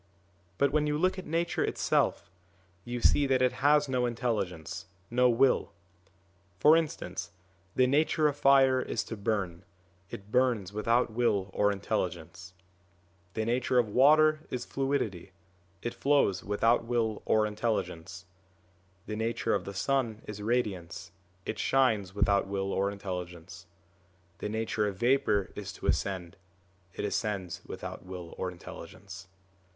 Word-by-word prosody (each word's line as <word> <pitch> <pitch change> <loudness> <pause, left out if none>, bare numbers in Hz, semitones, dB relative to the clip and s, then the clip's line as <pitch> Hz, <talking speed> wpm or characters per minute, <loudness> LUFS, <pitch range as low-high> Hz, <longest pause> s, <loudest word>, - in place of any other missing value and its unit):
But 140 +4 +3
when 150 0 +2
you 150 0 0
look 185 +3 +1
at - - -9
Nature 165 +2 0
itself, 85 - 0 0.5
you 120 0 -4
see 140 +3 +4
that 130 -1 +2
it 125 - +4
has 145 +1 +4
no 125 -2 +1
intelligence, 105 -9 -3 0.2
no 125 +1 +4
will. 125 -3 +2 0.9
For 150 +7 +7
instance, 95 - -2 0.5
the 130 - +5
nature 150 +3 +3
of 145 - -1
fire 135 -2 +5
is 120 - -2
to 115 - -6
burn, 100 -5 -2 0.5
it 100 +1 -9
burns 120 -7 +1
without 115 +3 +1
will 105 -5 +1
or 105 0 +3
intelligence; 90 -2 -4 0.8
the 110 - -1
nature 125 +2 +1
of 120 -3 +3
water 155 +6 +5
is 125 -1 -4
fluidity, 115 -10 -2 0.5
it 120 - -2
flows 140 -10 +2
without 115 +4 +2
will 115 -2 -1
or 110 0 +3
intelligence; 100 -5 -3 0.8
the 105 - -4
nature 115 +2 -1
of - - -1
the 100 - -6
sun 115 -1 -1
is 105 -1 -7
radiance, 105 -8 -2 0.3
it - - -4
shines 110 -8 +2
without 100 -1 +2
will 95 0 -2
or 100 +1 +1
intelligence; 90 -2 -7 0.7
the 105 - -3
nature 110 -1 -1
of 100 - -3
vapour 120 -5 +2
is - - -6
to - - -10
ascend, 90 -4 -1 0.6
it - - -3
ascends 95 -3 -2
without 95 0 -7
will 90 -2 -8
or 95 - -1
intelligence. 85 0 -10
110 Hz, 140 wpm, -29 LUFS, 95-130 Hz, 0.9 s, For